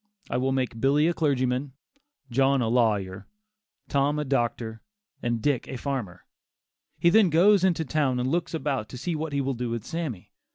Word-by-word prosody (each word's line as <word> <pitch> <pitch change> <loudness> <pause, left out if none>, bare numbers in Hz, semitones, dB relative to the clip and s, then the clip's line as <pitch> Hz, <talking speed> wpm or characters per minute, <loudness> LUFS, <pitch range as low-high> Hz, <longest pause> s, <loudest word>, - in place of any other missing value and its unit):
I - - +1
will 130 +1 0
make 130 -4 -2
Billy 145 +4 +3
a 170 - +2
clergyman; 130 -3 0 0.6
John 135 +2 +3
a 115 -3 0
lawyer; 105 -5 0 0.6
Tom 140 +1 +1
a 150 - -1
doctor, 120 -4 -1 0.4
and 120 -2 -2
Dick 145 -4 +1
a 130 - -5
farmer." 120 -11 -4 0.7
He 170 - +4
then 215 -2 +5
goes 185 +4 +5
into 170 -4 +2
town 135 -4 0
and 125 - -1
looks 165 +3 -1
about 135 -7 -2
to 125 - -8
see 170 +7 -3
what 155 0 -3
he 140 0 0
will 135 0 -1
do 120 -1 -3
with 115 -2 -4
Sammy. 155 - -5
135 Hz, 180 wpm, -26 LUFS, 120-150 Hz, 0.7 s, then